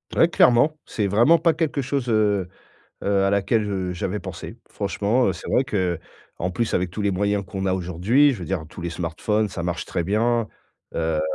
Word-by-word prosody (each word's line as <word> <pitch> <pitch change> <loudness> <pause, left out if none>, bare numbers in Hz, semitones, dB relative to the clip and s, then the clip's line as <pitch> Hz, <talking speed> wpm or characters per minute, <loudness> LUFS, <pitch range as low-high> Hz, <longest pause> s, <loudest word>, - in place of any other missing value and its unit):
Ouais 165 - +5
clairement, 150 +1 +4
c'est 105 - -2
vraiment 120 - +5
pas 165 +1 +3
quelque 155 -3 -1
chose, 135 -1 -2
heu 105 -4 +2 0.6
heu, 100 -1 +2
à 100 - +2
laquelle, 100 +2 +2
heu, 95 -2 -2
j'avais 90 +3 -3
pensé. - - -8
Franchement, 105 +5 0
heu, - - +1
c'est 85 - -9
vrai 130 - +3
qu'en 90 -4 -4
plus 110 +5 -1
avec 90 0 0
tous 105 - -4
les 100 -1 +1
moyens 100 +1 0
qu'on 95 +1 -4
a 95 - +2
aujourd'hui, 95 - +2
je 115 - -6
veux - - -5
dire 90 -2 -3
tous 85 - -10
les 85 0 -3
smartphones, 90 +6 -1
ça 85 -2 -5
marche 85 -1 -2
très 85 - -2
bien. 110 +4 +1 0.4
Heu, 80 -1 0
100 Hz, 200 wpm, -23 LUFS, 90-115 Hz, 0.6 s, Ouais